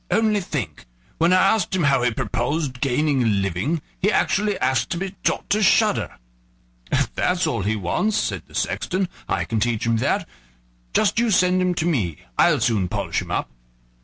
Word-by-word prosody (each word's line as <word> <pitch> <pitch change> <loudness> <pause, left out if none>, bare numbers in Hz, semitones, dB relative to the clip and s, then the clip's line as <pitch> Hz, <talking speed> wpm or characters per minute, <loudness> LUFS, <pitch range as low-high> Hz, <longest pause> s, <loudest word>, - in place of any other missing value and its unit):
"Only 215 +1 +2
think! 100 - -5 0.3
when 170 +2 +3
I - - +6 0.2
asked 195 -3 -1
him 180 - +1
how 140 -3 +3
he 125 - +3
purposed 130 +4 -2
gaining 140 +1 +1
a 120 - +2
livelihood, 100 - 0 0.2
he 205 +3 +2
actually 205 -1 +1
asked 130 +1 0
to - - -2
be 190 +1 -3
taught - - 0
to 210 +1 +2
shudder." 210 - +2 0.8
"If - - 0
that's 180 0 +1
all 115 - -1
he 105 +3 0
wants," 110 - 0
said - - -1
the - - -15
sexton, 185 0 -1 0.2
"I - - 0
can 115 - -1
teach 115 0 0
him 115 0 +2
that; - - 0 0.7
just 215 +1 +3
you 235 0 +2
send 185 -2 +3
him 180 -1 +1
to 165 - -1
me, 105 - 0 0.2
I'll 155 -5 +4
soon 110 -6 +1
polish - - -2
him - - -9
up." - - -2
150 Hz, 190 wpm, -22 LUFS, 115-185 Hz, 0.8 s, I